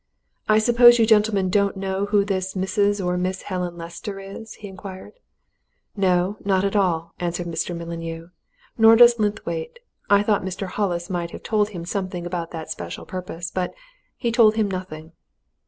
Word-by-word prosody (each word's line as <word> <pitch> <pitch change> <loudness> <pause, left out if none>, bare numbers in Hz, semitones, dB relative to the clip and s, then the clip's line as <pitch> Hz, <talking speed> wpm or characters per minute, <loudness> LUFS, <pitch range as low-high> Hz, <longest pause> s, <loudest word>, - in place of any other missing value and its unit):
"I 215 - +6
suppose 240 +2 +7
you 230 - +4
gentlemen 210 -4 +3
don't 200 0 +2
know 195 +1 -2
who 205 -1 +2
this 190 -1 -2
Mrs. 200 +1 0
or 180 0 0
Miss 185 +1 -2
Helen 180 -2 -4
Lester 170 +4 -7
is?" 195 +3 -9
he 210 - -9
inquired. 190 -1 -10 0.8
"No 190 0 +1
not 190 -1 +2
at 200 - -1
all," 170 -5 +1
answered 175 0 -2
Mr. 170 +1 -3
Mullineau. 165 0 -6 0.5
"Nor 225 0 +8
does 240 0 +7
Linthwaite. 205 - -2 0.3
I 200 0 +5
thought 210 -1 +2
Mr. 190 +1 -4
Hollis 185 -2 -2
might 175 -2 -2
have - - -10
told 210 -2 +1
him 175 -5 -7
something 185 -2 -4
about 175 -1 -4
that 160 -2 -7
special 85 -1 -6
purpose. 175 -2 -6
But 185 -1 -3 0.4
he 235 -3 -1
told 225 -2 +5
him 215 -3 0
nothing." 165 -4 -6
190 Hz, 170 wpm, -23 LUFS, 175-205 Hz, 0.8 s, Nor